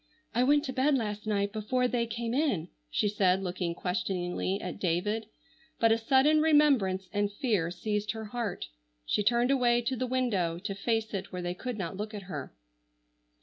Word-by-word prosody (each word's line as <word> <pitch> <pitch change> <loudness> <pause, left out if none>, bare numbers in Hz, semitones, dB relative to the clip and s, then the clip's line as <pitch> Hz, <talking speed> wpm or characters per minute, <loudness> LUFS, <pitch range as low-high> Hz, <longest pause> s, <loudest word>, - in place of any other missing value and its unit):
"I 240 - +2
went 290 +3 +4
to 260 - -4
bed 275 +3 +3
last 210 -2 -3
night 200 -1 0
before 250 +4 0
they 240 -2 0
came 230 +1 -3
in," 245 - 0 0.2
she 210 - +1
said, 195 -2 +2
looking 175 -2 -2
questioningly 180 +1 -2
at - - -6
David, 205 +5 0 0.5
but 230 -1 +4
a 225 - +4
sudden 270 +6 +4
remembrance 275 -12 +3
and 205 0 +1
fear 205 - 0
seized 210 +4 -2
her 220 -1 -6
heart. 215 - -4 0.4
She 210 - +1
turned 240 +4 +3
away 245 -3 +3
to 260 +3 -1
the 255 +1 -2
window 215 -10 0
to 195 +3 -4
face 220 +2 -1
it 195 0 -4
where 180 -1 -4
they 175 0 -2
could 245 +5 -5
not 190 -1 -4
look 215 +1 -5
at 205 - -6
her. 150 -7 -6
210 Hz, 185 wpm, -30 LUFS, 190-245 Hz, 0.5 s, went